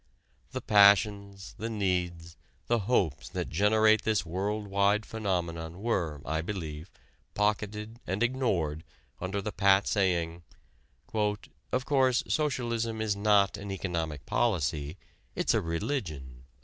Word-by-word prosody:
The - - -5
passions, 100 -1 +4
the 115 - -3
needs, 90 -5 -2 0.3
the 120 0 +2
hopes 80 - +1
that - - -4
generate 110 +5 +4
this 110 -5 0
world 100 +5 -2
wide 100 +2 +2
phenomenon 85 -5 -3
were, 85 -11 -1
I 80 +4 -1
believe, 80 -3 -5 0.5
pocketed 105 +2 -1
and 95 +5 0
ignored 95 - 0 0.4
under 95 +2 -3
the 105 - -3
pat 100 0 +4
saying: 85 -4 0 0.7
"Of 105 - -2
course, 130 -3 +3
socialism 120 -7 -1
is 110 -2 0
not 100 -1 +3
an 100 0 -7
economic 85 -7 -3
policy, 80 - 0 0.4
it's - - +1
a - - +2
religion." 80 - -4
100 Hz, 120 wpm, -29 LUFS, 85-110 Hz, 0.7 s, passions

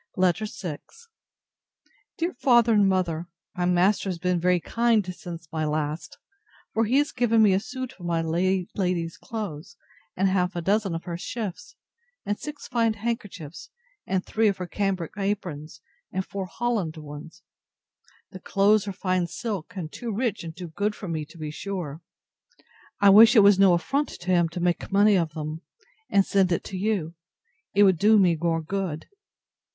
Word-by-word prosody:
LETTER 185 +3 +2
VI 175 -7 -6 1.4
DEAR 340 +2 -1
FATHER 240 -3 +4
AND 205 -2 +4
MOTHER, 175 -3 -1 0.3
My 180 - -1
master 180 +3 +2
has 180 - -3
been 180 0 0
very 180 +1 +3
kind 230 +2 +1
since 170 -2 -9
my 160 -1 -2
last; 150 +1 -3 0.6
for 225 +1 +2
he 245 +5 +2
has 290 0 +2
given 230 -2 +3
me 200 -3 +5
a 190 - +3
suit 255 +3 -6
of 175 - -6
my 170 -1 +1
late 180 +3 0
lady's 175 -3 -1
clothes, 200 - -7 0.4
and 195 +2 +3
half 185 -1 +1
a 175 - -2
dozen 195 0 +1
of 165 - -5
her 170 -1 -5
shifts, 210 -3 -6 0.5
and 205 0 -2
six 300 -1 -7
fine 230 -3 +1
handkerchiefs, 200 -8 -5 0.4
and 190 -1 -1
three 220 0 +1
of 200 - +1
her 180 - -4
cambric 190 -3 -2
aprons, 175 -7 -4 0.3
and 190 0 -2
four 195 -2 -5
holland 210 -7 -2
ones. 150 +1 -10 0.9
The 190 - -9
clothes 205 +2 +2
are 200 - -3
fine 185 -2 0
silk, 205 -4 -5
and 165 -5 -5
too 235 -2 -5
rich 220 -2 -1
and 165 0 -8
too 180 -2 -7
good 205 +6 -1
for 195 - -8
me, 160 -3 -3
to 160 +3 -16
be 155 -1 -5
sure. 170 -3 -5 1.0
I 200 -1 +7
wish 225 +5 +8
it 215 - +8
was 200 -1 +6
no 195 -2 +6
affront 280 +12 -1
to 185 +1 -2
him 170 -2 +3
to 170 - -6
make 175 +2 -1
money 205 +1 +5
of 165 -4 0
them, 155 +1 -5 0.5
and 195 -1 +4
send 190 -2 +2
it 170 - 0
to 195 - -7
you: 190 -5 -1 0.6
it 205 - +6
would 190 -4 +4
do 215 +1 +5
me 180 -4 +4
more 165 0 -1
good. 175 -3 -3
185 Hz, 175 wpm, -25 LUFS, 170-210 Hz, 1.4 s, wish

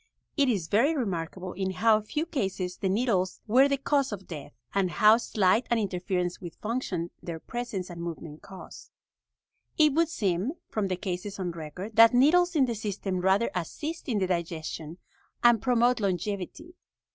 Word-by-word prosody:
It 280 -3 +3
is 195 -9 0
very 255 - +3
remarkable 185 - -3
in 190 0 -2
how 215 +3 +3
few 300 +9 -3
cases 190 - -3
the 190 - -1
needles 195 -3 0
were 255 +5 +5
the 280 0 +1
cause 275 -1 +1
of 195 -2 -6
death, 150 -4 -8 0.2
and 195 -2 +1
how 215 +5 +6
slight 215 0 +1
an 235 - +2
interference 180 -3 -2
with 170 -3 -8
function 210 -7 -3
their 165 -2 -6
presence 240 -4 -5
and 170 -1 -7
movement 165 -2 -7
cause." 190 -1 -12 0.9
It 305 -3 +5
would 330 +1 +2
seem, 200 - -1 0.2
from 210 -3 -1
the 185 - -1
cases 190 +1 -4
on 185 -3 -3
record, 175 +7 -8
that 230 +1 +8
needles 350 +7 +4
in 280 -4 +4
the 240 - -2
system 200 -3 -3
rather 190 +5 +2
assist 295 - -5
in 225 - +1
the 190 - +1
digestion 165 -2 -4 0.5
and 240 -3 +6
promote 245 -1 +3
longevity. 200 - -3
200 Hz, 170 wpm, -28 LUFS, 180-245 Hz, 0.9 s, that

